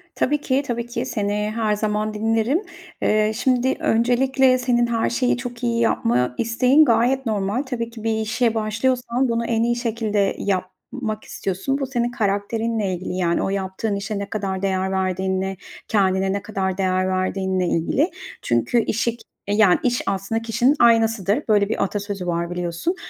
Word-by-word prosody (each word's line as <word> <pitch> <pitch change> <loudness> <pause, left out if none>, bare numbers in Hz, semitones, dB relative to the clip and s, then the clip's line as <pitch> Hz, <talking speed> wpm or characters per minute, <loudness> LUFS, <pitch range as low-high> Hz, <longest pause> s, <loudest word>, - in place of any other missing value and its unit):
Tabii 295 +2 +1
ki, 265 -1 +1
tabii 235 -1 -2
ki. 240 +1 -4
Seni 210 0 -1
her 220 -2 +1
zaman 215 0 -1
dinlerim. 225 - +1 0.4
Eee, 215 0 +2
şimdi, 255 +2 +1
öncelikle 255 +3 +3
senin 245 -1 +1
her 230 -1 0
şeyi 250 +1 +1
çok 245 -1 -7
iyi 235 -1 +1
yapma 125 - +1
isteğin 250 +6 +4
gayet 245 +2 +2
normal. 210 +3 -1
Tabii 240 -4 -4
ki 230 -2 -11
bir 225 -1 0
işe 230 +1 0
başlıyorsan 240 +3 0
bunu 230 0 0
en 230 -1 +1
iyi 240 0 +1
şekilde 220 -4 0
yapmak 205 +4 -3
istiyorsun. 195 +9 -3
Bu 275 - -1
senin 240 -2 -1
karakterinle 215 -1 -1
ilgili, 180 0 -4
yani, 170 -2 +1
o - - -1
yaptığın 195 +2 -2
işe 200 +1 -3
ne 200 - -5
kadar 195 -3 -3
değer 190 -1 0
verdiğinle, 190 0 -1 0.3
kendine 190 -2 +2
ne 200 - -2
kadar 190 -3 -2
değer 185 -1 +1
verdiğinle 185 0 0
ilgili. 245 - +1 0.3
Çünkü 120 - +1
işi 230 +2 -1
k - - -18 0.3
e, 200 - 0
yani, 205 -4 +5
iş 245 -1 +1
aslında 195 +3 -1
kişinin 240 +5 +2
aynasıdır. 225 0 +3
Böyle 205 -2 +3
bir 225 - 0
atasözü 200 -2 -4
var 170 0 -1
biliyorsun. 175 - -2
220 Hz, 165 wpm, -22 LUFS, 195-240 Hz, 0.4 s, yani